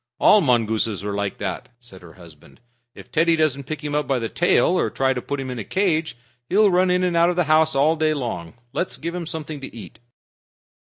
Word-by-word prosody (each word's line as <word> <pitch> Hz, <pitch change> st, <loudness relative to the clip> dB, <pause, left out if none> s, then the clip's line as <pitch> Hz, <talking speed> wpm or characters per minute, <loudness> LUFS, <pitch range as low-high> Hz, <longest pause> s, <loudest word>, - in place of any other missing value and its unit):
"All 210 Hz, -, +5 dB
mongooses 110 Hz, -, +1 dB
are 105 Hz, 0 st, -3 dB
like 100 Hz, -1 st, -3 dB
that," 95 Hz, -4 st, -5 dB
said 115 Hz, -6 st, -14 dB
her 85 Hz, -2 st, -14 dB
husband. 80 Hz, -6 st, -17 dB, 0.4 s
"If -, -, -14 dB
Teddy 165 Hz, +1 st, +3 dB
doesn't 145 Hz, -4 st, 0 dB
pick 155 Hz, +1 st, -6 dB
him 150 Hz, -1 st, -4 dB
up 150 Hz, -2 st, 0 dB
by 135 Hz, -, +1 dB
the 115 Hz, -2 st, -3 dB
tail, 175 Hz, -, +2 dB
or 180 Hz, -, +1 dB
try 135 Hz, 0 st, 0 dB
to 125 Hz, -, -4 dB
put 140 Hz, +2 st, -4 dB
him 130 Hz, -1 st, -4 dB
in 125 Hz, -, -5 dB
a -, -, -4 dB
cage, 165 Hz, -, -1 dB, 0.3 s
he'll 205 Hz, +2 st, +4 dB
run 180 Hz, +1 st, +3 dB
in 180 Hz, 0 st, +2 dB
and 180 Hz, -2 st, 0 dB
out 170 Hz, +1 st, +4 dB
of 180 Hz, -, -1 dB
the 180 Hz, -, +2 dB
house 155 Hz, -1 st, +3 dB
all 150 Hz, +4 st, +3 dB
day 155 Hz, -1 st, +1 dB
long. 115 Hz, -, -5 dB, 0.2 s
Let's 125 Hz, -1 st, -3 dB
give 165 Hz, +5 st, -5 dB
him 175 Hz, -2 st, -5 dB
something 155 Hz, -3 st, -6 dB
to 135 Hz, -, -9 dB
eat." 110 Hz, +1 st, -11 dB
145 Hz, 230 wpm, -22 LUFS, 115-165 Hz, 0.4 s, All